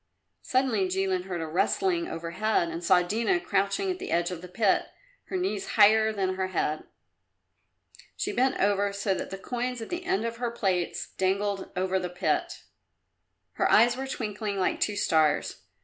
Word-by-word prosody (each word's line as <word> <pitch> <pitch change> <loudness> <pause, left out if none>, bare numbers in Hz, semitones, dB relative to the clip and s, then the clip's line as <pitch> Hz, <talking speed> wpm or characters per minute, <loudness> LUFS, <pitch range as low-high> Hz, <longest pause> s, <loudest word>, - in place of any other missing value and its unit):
Suddenly 255 -7 +1
Jilin 185 -1 -1
heard 180 -3 -4
a - - -2
rustling 340 - 0
overhead 170 +3 -1
and 165 +1 -6
saw 180 0 +5
Dina 230 - +1
crouching 200 - 0
at 365 - -5
the 385 - -6
edge 170 +1 +1
of 175 -2 -6
the 180 - -9
pit, 200 +2 +1 0.4
her 375 - -3
knees 360 - -2
higher 220 +1 +6
than 190 -3 -1
her 190 0 0
head. 155 -4 -2 1.3
She - - -1
bent 260 +2 +1
over 200 0 +2
so 200 0 0
that - - -4
the 195 - -6
coins 245 +4 -3
at 225 - -7
the 355 +1 -4
end 380 -7 0
of 230 0 -3
her 240 0 -1
plaits 190 -7 -2
dangled 195 +1 0
over 190 +1 0
the 180 -1 -4
pit. 180 -3 -1 0.9
Her - - 0
eyes 235 +3 +6
were 265 +1 -4
twinkling 210 -5 -3
like 185 - 0
two 210 - 0
stars. 155 -6 +1
200 Hz, 175 wpm, -27 LUFS, 185-235 Hz, 1.3 s, higher